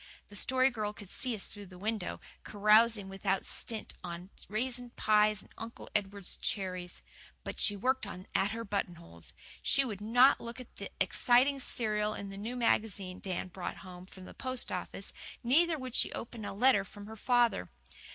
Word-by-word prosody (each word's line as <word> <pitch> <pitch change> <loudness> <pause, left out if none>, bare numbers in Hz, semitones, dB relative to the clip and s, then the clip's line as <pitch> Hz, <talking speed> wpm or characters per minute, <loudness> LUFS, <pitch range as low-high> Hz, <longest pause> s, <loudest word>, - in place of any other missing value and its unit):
The 205 - -11
Story 260 +4 +3
Girl 210 -3 -2
could 205 -3 -11
see 250 -3 0
us 200 - -3
through 205 -1 -10
the 180 0 -12
window, 210 0 -2 0.2
carousing 215 0 +4
without 195 0 -1
stint 225 -3 -1
on 175 +2 -6 0.2
raisin 245 +3 -2
pies 210 -1 +3
and - - -21
Uncle 230 +1 -8
Edward's 200 -2 -2
cherries. 185 -3 -3 0.4
But - - -5
she 205 - +4
worked 255 +2 +1
on 185 -2 -7
at 195 - +3
her 230 +1 -4
buttonholes. 170 - -4 0.3
She 275 0 +3
would 210 -5 -5
not 245 +6 +6
look 235 +2 -7
at 250 - -11
the - - -5
exciting 260 +3 +4
serial 215 -4 0
in 200 - -6
the 195 - -8
new 225 +5 -4
magazine 205 -6 +1
Dan 185 -1 -3
brought 180 0 -5
home 180 0 -10
from 190 -1 -11
the - - -10
post 255 -1 -1
office, - - -4 0.3
neither 320 +7 +4
would 255 -3 -6
she - - +2
open 230 -2 -6
a - - -4
letter 240 -2 +5
from 205 +1 -10
her 220 +1 -8
father. 235 - +2
210 Hz, 180 wpm, -32 LUFS, 195-240 Hz, 0.4 s, not